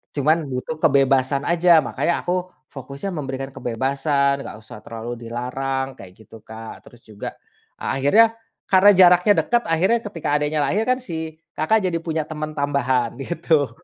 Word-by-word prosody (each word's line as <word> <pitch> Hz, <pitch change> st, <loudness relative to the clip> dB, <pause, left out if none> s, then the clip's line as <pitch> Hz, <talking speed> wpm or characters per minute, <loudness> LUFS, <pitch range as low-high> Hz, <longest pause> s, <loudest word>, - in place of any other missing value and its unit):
Cuman 150 Hz, +3 st, +3 dB
butuh 130 Hz, +5 st, -4 dB
kebebasan 135 Hz, -1 st, +3 dB
aja, 175 Hz, +1 st, +2 dB, 0.2 s
makanya 170 Hz, -, 0 dB
aku 175 Hz, -, -1 dB, 0.4 s
fokusnya 140 Hz, +7 st, -6 dB
memberikan 135 Hz, -2 st, -5 dB
kebebasan, 140 Hz, +3 st, 0 dB
nggak -, -, -8 dB
usah 110 Hz, -1 st, -12 dB
terlalu 115 Hz, +1 st, -7 dB
dilarang, 135 Hz, +3 st, -3 dB
kayak 95 Hz, -, -12 dB
gitu, 110 Hz, -, -15 dB
Kak. 110 Hz, 0 st, -10 dB
Terus 120 Hz, -, -17 dB
juga, 105 Hz, -2 st, -8 dB, 0.5 s
akhirnya 220 Hz, +13 st, +3 dB, 0.4 s
karena 190 Hz, +1 st, +7 dB
jaraknya 180 Hz, +2 st, +6 dB
dekat 240 Hz, 0 st, +2 dB
akhirnya 190 Hz, +8 st, +2 dB
ketika 195 Hz, -9 st, -5 dB
adiknya 150 Hz, +1 st, 0 dB
lahir 205 Hz, +10 st, 0 dB
kan 255 Hz, -, +3 dB
si 160 Hz, -10 st, -6 dB, 0.2 s
kakak 195 Hz, +5 st, +1 dB
jadi 175 Hz, -2 st, 0 dB
punya 160 Hz, -2 st, -2 dB
teman 155 Hz, 0 st, -5 dB
tambahan 130 Hz, -4 st, 0 dB
gitu. 160 Hz, -2 st, 0 dB
145 Hz, 145 wpm, -21 LUFS, 130-170 Hz, 0.5 s, karena